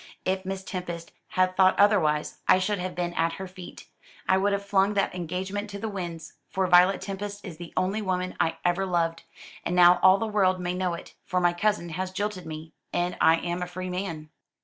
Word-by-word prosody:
If 190 Hz, 0 st, -1 dB
Miss 190 Hz, 0 st, -4 dB
Tempest 175 Hz, -3 st, -6 dB, 0.2 s
had 185 Hz, 0 st, +1 dB
thought 185 Hz, 0 st, +4 dB
otherwise, 170 Hz, -8 st, +3 dB
I -, -, +7 dB
should 195 Hz, +2 st, -1 dB
have 180 Hz, 0 st, -4 dB
been 175 Hz, -1 st, -2 dB
at 165 Hz, 0 st, +1 dB
her 190 Hz, -, -6 dB
feet. 180 Hz, -1 st, -11 dB, 0.4 s
I 190 Hz, -, +4 dB
would 195 Hz, +2 st, +2 dB
have 200 Hz, 0 st, -1 dB
flung 200 Hz, +1 st, +2 dB
that 195 Hz, -, +1 dB
engagement 185 Hz, +4 st, -4 dB
to 200 Hz, -, -6 dB
the 220 Hz, -, -4 dB
winds; 175 Hz, -5 st, -6 dB, 0.2 s
for 190 Hz, 0 st, 0 dB
Violet 180 Hz, +2 st, +5 dB
Tempest 205 Hz, +1 st, -6 dB
is 175 Hz, -5 st, -8 dB
the 170 Hz, 0 st, -9 dB
only 195 Hz, +4 st, 0 dB
woman 185 Hz, -2 st, -2 dB
I 165 Hz, 0 st, +1 dB
ever 175 Hz, +2 st, +1 dB
loved. 165 Hz, -2 st, 0 dB, 0.4 s
And 175 Hz, -, -1 dB
now 180 Hz, 0 st, +7 dB
all 190 Hz, +1 st, +7 dB
the 225 Hz, -, -2 dB
world 195 Hz, -4 st, +2 dB
may 180 Hz, 0 st, -2 dB
know 180 Hz, -1 st, -1 dB
it, -, -, -11 dB
for 185 Hz, -, -1 dB
my 175 Hz, -1 st, +3 dB
cousin 190 Hz, -1 st, 0 dB
has 185 Hz, +3 st, -3 dB
jilted 200 Hz, -1 st, -4 dB
me, 155 Hz, 0 st, -8 dB, 0.2 s
and 175 Hz, 0 st, -1 dB
I 160 Hz, -, +6 dB
am 175 Hz, +1 st, -3 dB
a 180 Hz, -, -2 dB
free 185 Hz, +1 st, -5 dB
man." 165 Hz, -5 st, -5 dB
185 Hz, 215 wpm, -26 LUFS, 175-195 Hz, 0.4 s, I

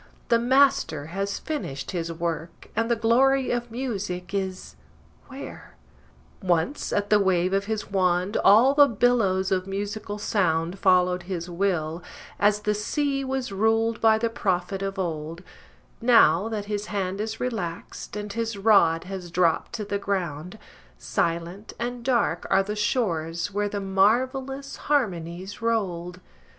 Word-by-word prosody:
The 235 Hz, -1 st, +4 dB
Master 245 Hz, -, +3 dB
has 195 Hz, +1 st, -2 dB
finished 140 Hz, -, -5 dB
his 170 Hz, -3 st, -3 dB
work, 165 Hz, 0 st, -5 dB
and 230 Hz, +1 st, 0 dB
the 235 Hz, -, +3 dB
glory 255 Hz, +4 st, +3 dB
of 240 Hz, 0 st, -2 dB
music 200 Hz, -7 st, -4 dB
is 190 Hz, -1 st, -4 dB, 0.5 s
where? 270 Hz, +1 st, -10 dB, 0.7 s
Once, 180 Hz, -, 0 dB
at 205 Hz, 0 st, -1 dB
the 210 Hz, -, +6 dB
wave 185 Hz, -1 st, +2 dB
of 195 Hz, 0 st, +1 dB
his 215 Hz, -1 st, -4 dB
wand, 185 Hz, +1 st, +1 dB
all 235 Hz, +7 st, +6 dB
the 285 Hz, 0 st, +7 dB
billows 205 Hz, -6 st, +2 dB
of 185 Hz, 0 st, 0 dB
musical 205 Hz, +1 st, -4 dB
sound 180 Hz, -3 st, 0 dB
Followed 180 Hz, -1 st, +3 dB
his 175 Hz, -1 st, -4 dB
will, 170 Hz, -3 st, -1 dB, 0.4 s
as 205 Hz, 0 st, +3 dB
the 210 Hz, 0 st, +1 dB
sea 275 Hz, +6 st, -1 dB
was 265 Hz, -3 st, -3 dB
ruled 225 Hz, +3 st, +1 dB
by 220 Hz, -1 st, +5 dB
the 230 Hz, +1 st, 0 dB
prophet 190 Hz, -2 st, -1 dB
of 195 Hz, 0 st, -3 dB
old: 165 Hz, -1 st, -4 dB, 0.6 s
Now 225 Hz, -5 st, +5 dB
that 210 Hz, -2 st, -3 dB
his 210 Hz, 0 st, -3 dB
hand 195 Hz, -1 st, -2 dB
is 220 Hz, +1 st, -4 dB
relaxed, 210 Hz, -8 st, -5 dB
and 205 Hz, -1 st, -5 dB
his 230 Hz, -2 st, -2 dB
rod 195 Hz, -6 st, +4 dB
has 185 Hz, -1 st, -7 dB
dropped 170 Hz, -1 st, +1 dB
to 215 Hz, -, -4 dB
the 200 Hz, 0 st, -2 dB
ground, 180 Hz, -2 st, -3 dB, 0.4 s
Silent 170 Hz, +5 st, -2 dB
and 240 Hz, 0 st, -4 dB
dark 235 Hz, -9 st, +1 dB
are 195 Hz, -, +4 dB
the 210 Hz, +2 st, -4 dB
shores 175 Hz, -5 st, -1 dB
where 205 Hz, 0 st, 0 dB
the 205 Hz, -, -3 dB
mar 195 Hz, +5 st, +3 dB
vellous 270 Hz, +1 st, -7 dB
harmonies 190 Hz, -, -2 dB
rolled! 180 Hz, -6 st, -1 dB
200 Hz, 145 wpm, -25 LUFS, 180-225 Hz, 0.7 s, the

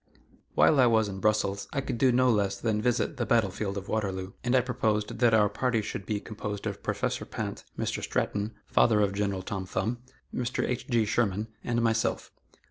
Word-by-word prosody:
While 150 Hz, -, +5 dB
I 125 Hz, -, +7 dB
was 110 Hz, -2 st, +3 dB
in 95 Hz, -1 st, -5 dB
Brussels 100 Hz, -1 st, +1 dB
I 140 Hz, -, -1 dB
could 130 Hz, -3 st, -4 dB
do 130 Hz, -2 st, +5 dB
no 130 Hz, +1 st, +4 dB
less 100 Hz, -3 st, +1 dB
than 105 Hz, 0 st, 0 dB
visit 125 Hz, +5 st, 0 dB
the 120 Hz, -, 0 dB
battle 110 Hz, -5 st, +3 dB
field 100 Hz, +1 st, -3 dB
of 100 Hz, -, -6 dB
Waterloo, 95 Hz, -3 st, -2 dB
and 125 Hz, +1 st, +2 dB
I 130 Hz, -, +6 dB
proposed 110 Hz, -4 st, -1 dB
that 120 Hz, -2 st, +4 dB
our 105 Hz, -1 st, +5 dB
party 115 Hz, +1 st, 0 dB
should 100 Hz, -, -5 dB
be 105 Hz, -1 st, -1 dB
composed 105 Hz, -1 st, -6 dB
of -, -, -4 dB
Professor -, -, -1 dB
Pinte, -, -, -5 dB
Mr. -, -, -2 dB
Stratton, 105 Hz, +1 st, -1 dB
father 110 Hz, -3 st, +4 dB
of 100 Hz, -1 st, +2 dB
General 100 Hz, -2 st, -1 dB
Tom 95 Hz, -1 st, -4 dB
Thumb, 110 Hz, +6 st, -2 dB, 0.3 s
Mr. 125 Hz, 0 st, -1 dB
H. 125 Hz, +2 st, -3 dB
G. 115 Hz, -3 st, +3 dB
Sherman, 105 Hz, -1 st, 0 dB
and 120 Hz, -1 st, 0 dB
myself. 115 Hz, -1 st, 0 dB
110 Hz, 200 wpm, -28 LUFS, 100-120 Hz, 0.3 s, I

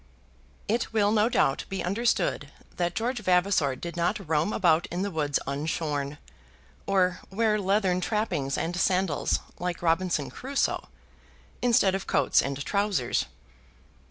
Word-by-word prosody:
It 230 Hz, +2 st, 0 dB
will 205 Hz, -2 st, +3 dB
no 220 Hz, +1 st, +3 dB
doubt 135 Hz, -, +1 dB
be 195 Hz, -, -3 dB
understood 225 Hz, +7 st, 0 dB, 0.3 s
that 175 Hz, -1 st, -1 dB
George 245 Hz, +2 st, -1 dB
Vavasor 180 Hz, -7 st, +2 dB
did 170 Hz, +6 st, -7 dB
not 175 Hz, +2 st, -1 dB
roam 160 Hz, +5 st, +1 dB
about 170 Hz, -4 st, +2 dB
in 180 Hz, +2 st, -3 dB
the 200 Hz, -, -2 dB
woods 150 Hz, -4 st, 0 dB
unshorn, 145 Hz, 0 st, -2 dB, 0.7 s
or 185 Hz, -2 st, +2 dB
wear 215 Hz, +1 st, +1 dB
leathern 190 Hz, -2 st, +1 dB
trappings 175 Hz, -10 st, -1 dB
and 170 Hz, +2 st, -2 dB
sandals, 185 Hz, -3 st, +1 dB, 0.2 s
like 175 Hz, -1 st, -3 dB
Robinson 165 Hz, -3 st, +1 dB
Crusoe, 275 Hz, +2 st, -2 dB, 0.7 s
instead 230 Hz, -6 st, +4 dB
of 195 Hz, 0 st, -3 dB
coats -, -, +3 dB
and 140 Hz, 0 st, -4 dB
trousers. 200 Hz, -11 st, 0 dB
180 Hz, 130 wpm, -27 LUFS, 160-205 Hz, 0.7 s, instead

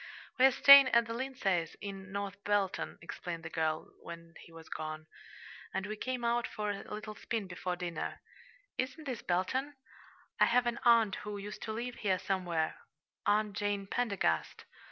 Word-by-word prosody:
"We 255 Hz, -, +8 dB
are -, -, +3 dB
staying 280 Hz, +1 st, +10 dB
at 235 Hz, -2 st, +4 dB
the 230 Hz, -, -5 dB
Lindsays', 215 Hz, -10 st, -1 dB
in 195 Hz, -2 st, -7 dB
North 200 Hz, 0 st, -4 dB
Belton," 205 Hz, -2 st, 0 dB
explained 170 Hz, 0 st, -6 dB
the 160 Hz, -, -7 dB
girl, 160 Hz, -1 st, -1 dB
when 170 Hz, 0 st, -10 dB
he -, -, -14 dB
was 165 Hz, -1 st, -12 dB
gone, 155 Hz, 0 st, -5 dB, 0.7 s
"and 190 Hz, -, -1 dB
we 215 Hz, +1 st, -4 dB
came 250 Hz, +2 st, -3 dB
out 235 Hz, 0 st, +1 dB
for 210 Hz, -1 st, -3 dB
a 200 Hz, -, -7 dB
little 215 Hz, 0 st, -5 dB
spin 220 Hz, 0 st, -3 dB
before 180 Hz, 0 st, -3 dB
dinner. 175 Hz, -2 st, -4 dB, 0.6 s
Isn't 260 Hz, +5 st, -2 dB
this 255 Hz, -5 st, -4 dB
Belton? 255 Hz, +11 st, -1 dB, 0.6 s
I -, -, +7 dB
have 245 Hz, +1 st, +3 dB
an 240 Hz, 0 st, -1 dB
aunt 230 Hz, -4 st, +5 dB
who 210 Hz, -1 st, -5 dB
used 205 Hz, +1 st, -7 dB
to 220 Hz, -, -4 dB
live 235 Hz, +3 st, -4 dB
here 190 Hz, -3 st, +1 dB
somewhere 175 Hz, -5 st, -1 dB, 0.5 s
Aunt 210 Hz, 0 st, +2 dB
Jane 205 Hz, -1 st, -1 dB
Pendergast". 200 Hz, -, -1 dB
205 Hz, 170 wpm, -33 LUFS, 180-235 Hz, 0.7 s, staying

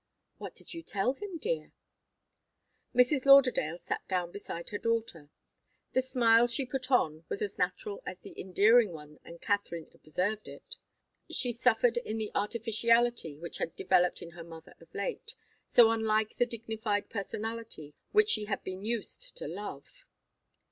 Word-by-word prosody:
"What -, -, -7 dB
did -, -, -4 dB
you 335 Hz, -, -6 dB
tell 220 Hz, -3 st, 0 dB
him, 390 Hz, +2 st, -7 dB
dear?" 485 Hz, +8 st, -3 dB, 1.2 s
Mrs. 255 Hz, +2 st, +4 dB
Lauderdale 255 Hz, -, +6 dB
sat -, -, -4 dB
down 180 Hz, -2 st, -1 dB
beside 170 Hz, -3 st, -7 dB
her 205 Hz, -, -4 dB
daughter. 225 Hz, -10 st, -2 dB, 0.6 s
The 260 Hz, -, +3 dB
smile 240 Hz, -2 st, +4 dB
she 240 Hz, +3 st, 0 dB
put 255 Hz, 0 st, -4 dB
on 160 Hz, -, +2 dB
was 200 Hz, -, -2 dB
as 205 Hz, -, -3 dB
unnatural 195 Hz, +3 st, -2 dB
as 185 Hz, -, -6 dB
the -, -, -12 dB
endearing 210 Hz, +2 st, +4 dB
tone, 150 Hz, -1 st, -11 dB
and 170 Hz, 0 st, -11 dB
Katharine 200 Hz, -6 st, -2 dB
observed 185 Hz, +7 st, -2 dB
it. -, -, -10 dB, 0.5 s
She 245 Hz, -, 0 dB
suffered 240 Hz, 0 st, +3 dB
in 225 Hz, -2 st, -2 dB
the 215 Hz, -1 st, -3 dB
artificiality 230 Hz, -4 st, +1 dB
which 170 Hz, +2 st, -7 dB
had 165 Hz, -, -3 dB
developed 180 Hz, -1 st, +2 dB
in 170 Hz, -, -9 dB
her 170 Hz, 0 st, -10 dB
mother 165 Hz, -1 st, -12 dB
of -, -, -18 dB
late, 460 Hz, -2 st, -4 dB, 0.3 s
so 230 Hz, -2 st, +7 dB
unlike 220 Hz, -1 st, +1 dB
the 245 Hz, -, +3 dB
dignified 220 Hz, -3 st, -2 dB
personality 220 Hz, -6 st, -5 dB, 0.2 s
which 430 Hz, 0 st, +4 dB
she 215 Hz, -1 st, +1 dB
had 205 Hz, -1 st, -3 dB
been 185 Hz, +1 st, -6 dB
used 235 Hz, -, -3 dB
to -, -, -5 dB
love. -, -, -8 dB
220 Hz, 155 wpm, -31 LUFS, 185-245 Hz, 1.2 s, so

